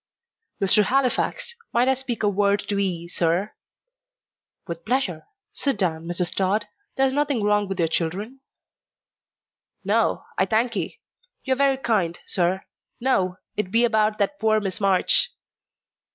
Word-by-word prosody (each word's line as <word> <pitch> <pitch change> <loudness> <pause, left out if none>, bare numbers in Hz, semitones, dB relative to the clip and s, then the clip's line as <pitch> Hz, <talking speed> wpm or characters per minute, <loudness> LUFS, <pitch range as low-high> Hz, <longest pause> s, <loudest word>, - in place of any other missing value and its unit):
"Mr. 200 +2 +4
Halifax, 275 - 0 0.2
might 240 +2 +2
I 265 - +5
speak 255 -4 -3
a - - +3
word 200 0 +2
to 200 -1 0
'ee, 175 -4 -2
sir?" 175 +4 0 1.1
"With 170 -2 -6
pleasure. 215 -9 -1 0.3
Sit 275 -6 0
down, 165 -4 -1
Mrs. 175 0 -1
Tod. 195 +3 0 0.3
There's 265 0 +3
nothing 285 -5 0
wrong 210 0 +2
with 195 -1 -4
your 170 -3 +2
children?" 190 +11 -3 1.4
"No, - - +1 0.2
I - - +3
thank'ee. 230 - -1 0.4
You 265 - +1
are - - 0
very 275 0 +2
kind, 210 -9 0
sir. 185 +1 0 0.3
No, 185 -8 +1 0.2
it 210 -3 -2
be 230 +4 +4
about 215 -2 +2
that 210 +8 -1
poor 215 0 +3
Miss 195 -1 -4
March." 195 - +3
210 Hz, 140 wpm, -24 LUFS, 185-250 Hz, 1.4 s, I